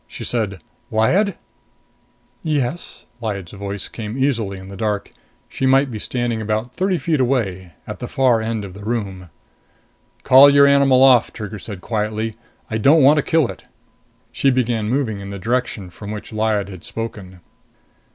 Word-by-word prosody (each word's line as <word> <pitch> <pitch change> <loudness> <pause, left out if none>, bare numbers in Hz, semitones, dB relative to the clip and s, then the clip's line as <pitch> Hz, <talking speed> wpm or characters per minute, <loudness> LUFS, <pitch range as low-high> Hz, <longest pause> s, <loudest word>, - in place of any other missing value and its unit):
She - - -8
said, 100 -8 -2 0.3
"Lyad?" 175 - +2 1.1
"Yes?" 150 0 -3 0.2
Lyad's 100 -6 -4
voice 100 -1 -4
came 110 +1 -6
easily 115 -8 0
in 95 0 -10
the 100 - -9
dark. 105 0 -2 0.4
She 135 - -2
might 135 0 +3
be 110 - -5
standing 120 -1 -2
about 110 +3 -2
thirty 185 0 0
feet 155 0 0
away, 100 -9 -1
at - - -7
the - - -5
far 125 -4 +2
end 110 -2 -3
of 95 - -10
the 100 +2 -11
room. 100 -5 -4 0.9
"Call 135 +2 +8
your 140 0 +6
animal 140 -2 +5
off," 130 -3 +5
Trigger 105 -1 -7
said 100 -2 -8
quietly. 110 0 -2 0.3
"I 110 - -2
don't 145 +6 +5
want 145 +3 +6
to - - +4
kill 160 -2 +2
it." - - -10 0.7
She 135 - +2
began 120 -4 0
moving 120 -5 -1
in 100 0 -8
the 100 - -6
direction 110 -3 -2
from 105 +3 -9
which 105 +1 -7
Lyad 110 -2 0
had 95 -4 -10
spoken. 100 -5 -7
110 Hz, 165 wpm, -20 LUFS, 100-130 Hz, 1.1 s, Call